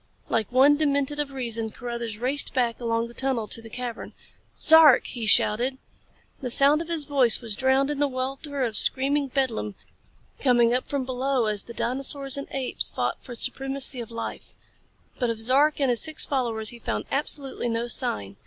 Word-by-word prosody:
Like 225 -1 -1
one 275 +4 +4
demented 285 -1 0
of 290 -1 -3
reason, 230 -4 -3
Carruthers 235 -1 -6
raced 265 +5 0
back 240 -3 0
along 230 0 -1
the 235 - -14
tunnel 250 -3 -1
to 230 - -3
the 225 - -12
cavern. 245 0 -7 0.4
"Zark!" 310 -4 +7
he 230 -3 -5
shouted. 240 +6 +3 0.6
The 255 - -5
sound 280 +5 +5
of 335 - -7
his 330 -3 -2
voice 265 -6 +6
was 225 -4 -4
drowned 265 +4 +1
in 290 - -4
the 290 - +2
welter 270 +2 -4
of 230 -3 -2
screaming 275 +5 +2
bedlam 245 -6 -2 0.6
coming 240 -3 +3
up 255 - -2
from 280 -2 -3
below 260 -1 -1
as 210 -2 0
the 235 - -11
dinosaurs 275 +2 -2
and 280 - -6
apes 270 -2 -3
fought - - -3
for 250 - -10
the - - -8
supremacy 270 +1 +1
of 230 - -9
life. 230 0 -7 0.6
But 245 -3 0
of 230 -1 -4
Zark 275 +7 +2
and 270 -3 +2
his 235 - 0
six 315 -1 +1
followers 230 -5 -2
he 240 - -9
found - - -4
absolutely 275 -3 -3
no 230 +1 -2
sign. 100 - 0
255 Hz, 185 wpm, -24 LUFS, 235-275 Hz, 0.6 s, Zark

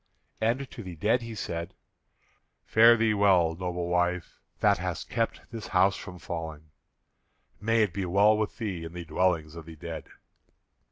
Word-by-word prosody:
And 120 +5 +1
to - - -8
the 90 -4 -8
dead 110 +9 +2
he 115 -1 -7
said, 85 -2 -5 0.9
"Fare 115 +2 +7
thee 110 -1 +2
well, 95 -5 +4
noble 90 0 -3
wife, 90 0 -1 0.2
that - - +3
hast - - -4
kept 115 -1 -1
this 115 -2 -6
house 95 +1 +3
from 90 -2 -8
falling. 80 -3 -6 0.9
May 115 +2 +3
it 105 - -1
be 100 -2 -2
well 100 +4 +4
with 105 -1 -2
thee 100 -8 -3
in 80 0 -8
the 90 -1 -6
dwellings 80 -3 0
of 85 -1 -10
the 80 - -9
dead!" 80 +1 -7
90 Hz, 165 wpm, -28 LUFS, 85-110 Hz, 0.9 s, Fare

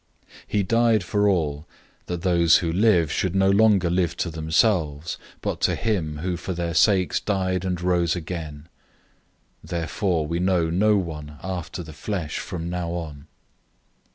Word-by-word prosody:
005:015 - - -37 0.2
He 105 -1 0
died 115 0 +3
for 105 +4 +1
all, 75 -5 -1 0.4
that 90 -1 -4
those 85 -3 +5
who 85 -2 -2
live 90 -6 +3
should 95 -1 -1
no 95 0 +4
longer 100 -3 +4
live 90 0 0
to 85 - -2
themselves, 80 -1 0 0.2
but - - -3
to - - +2
him 90 -10 -1
who 90 +3 -2
for 95 - -4
their 85 -1 -3
sakes 95 +1 +3
died 95 -3 -1
and 90 -2 -2
rose 85 -2 +2
again. 80 -3 -6 1.0
005:016 - - -14
Therefore 85 0 -1
we 85 +3 -2
know 90 -3 +1
no 105 +4 +3
one 75 -5 -5
after 90 -1 -5
the 80 -1 -10
flesh 85 0 -4
from 85 -2 -5
now 90 -1 -3
on. 80 -4 -6
85 Hz, 160 wpm, -24 LUFS, 80-95 Hz, 1.0 s, those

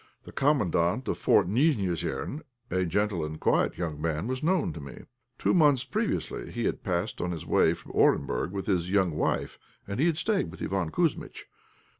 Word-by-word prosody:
The - - -11
Commandant 120 - +1
of - - -2
Fort 95 - +4
Nijnéosern, 105 - 0 0.3
a 95 +1 +1
gentle 95 0 0
and 75 0 -5
quiet - - +1
young 80 -4 -4
man, 80 +1 -1
was 130 +2 -3
known 175 +1 +1
to - - -8
me. 70 -2 -10 0.3
Two - - +1
months 145 -7 +4
previously 215 0 -2
he 120 - -3
had - - -1
passed 90 +1 -2
on 90 - -1
his 85 -3 -5
way - - +3
from - - -12
Orenburg 65 +1 +2
with 100 -1 -4
his 90 -3 0
young 95 -3 +2
wife, 75 - -1 0.3
and 100 +3 -4
he 160 - +4
had 165 -3 +1
stayed 205 - 0
with 90 - -11
Iván 95 -4 -1
Kouzmitch. 165 - -1
95 Hz, 185 wpm, -28 LUFS, 85-135 Hz, 0.3 s, Fort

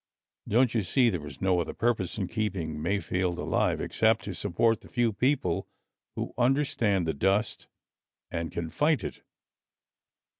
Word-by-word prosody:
Don't 120 +2 +3
you 115 - +2
see 120 +6 +3
there 80 -6 -4
is 70 +5 -9
no 95 -2 +3
other 85 - -3
purpose 115 -6 0
in 95 -4 -1
keeping 90 -8 -3
Mayfield 90 0 -1
alive - - 0
except 110 0 +2
to 100 - -5
support 100 +5 +1
the - - -14
few 120 -2 +1
people 125 - 0 0.5
who - - -4
understand 120 - +2
the 80 - 0
dust 95 +8 0 0.6
and 85 -1 -3
can 80 -1 -4
fight 150 0 +2
it? - - -6
100 Hz, 150 wpm, -28 LUFS, 85-115 Hz, 0.6 s, Don't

